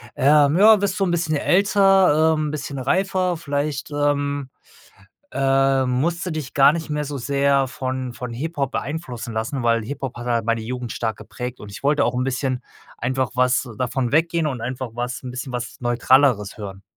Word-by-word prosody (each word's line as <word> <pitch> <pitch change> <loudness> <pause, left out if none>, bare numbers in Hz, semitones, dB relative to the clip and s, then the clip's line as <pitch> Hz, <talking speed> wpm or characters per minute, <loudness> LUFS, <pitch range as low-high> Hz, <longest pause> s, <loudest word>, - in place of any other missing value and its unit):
„Äh, - - -2
ja, 160 +9 +6
wirst 200 -1 -1
du 195 - +2
'n 180 - 0
bisschen 165 -2 0
älter, 190 -2 +4
ähm, 155 -1 -1
bisschen 140 -2 -5
reifer, 185 +4 0
vielleicht, 145 -1 -3
ähm, 145 -1 -1 0.8
ähm, 135 -1 +2
musst 165 +8 0
du 180 - -3
dich 155 -3 -5
gar 140 +1 +6
nicht 165 -2 -5
mehr 150 0 -2
so 145 0 -5
sehr 140 +1 +1
von 130 -1 -4
von 125 -1 -6
Hip-Hop 140 +1 -3
beeinflussen 125 -6 -5
lassen.“, 115 +4 -3
weil 115 -1 +2
Hip-Hop 135 +1 -5
hat 120 - -7
halt 115 -2 0
meine 115 -1 0
Jugend 125 +1 -5
stark 110 -2 -3
geprägt 125 0 -7
und 105 - -10
ich - - -9
wollte 145 0 +3
auch - - 0
'n 125 - 0
bisschen 130 -1 -2 0.4
einfach 130 +1 -1
was 125 +1 +2
davon 125 -1 -1
weggehen 165 +1 +2
und 130 -5 -4
einfach 125 +1 -4
was 120 +1 -4
'n 125 - -6
bisschen 130 +1 -6
was 125 0 -5
Neutraleres 120 -2 +2
hören. 100 -2 -8
135 Hz, 185 wpm, -22 LUFS, 125-150 Hz, 0.8 s, ja